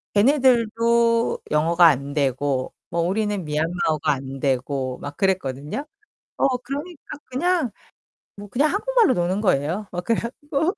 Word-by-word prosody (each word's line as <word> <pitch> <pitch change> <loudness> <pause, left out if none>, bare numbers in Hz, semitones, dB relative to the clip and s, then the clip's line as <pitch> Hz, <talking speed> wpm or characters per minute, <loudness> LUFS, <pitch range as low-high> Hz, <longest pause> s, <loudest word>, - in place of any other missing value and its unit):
걔네들도 235 -1 +3
영어가 170 +3 +4
안 140 -2 +1
되고 135 -1 0 0.2
뭐 170 0 -1
우리는 205 +2 -1
미얀마어가 155 0 0
안 135 0 -7
되고 130 -1 -1
막 145 0 -8
그랬거든요. 185 - -1 0.5
어 - - +3
그러니까 285 +5 -7
그냥 310 - 0 0.7
뭐 205 0 -10
그냥 285 +9 +1
한국말로 465 - +3
노는 180 +3 0
거예요. 180 +3 0
막 180 0 -4
그래 230 - +1
갖고 290 - -2
190 Hz, 290 characters per minute, -23 LUFS, -, 0.7 s, 영어가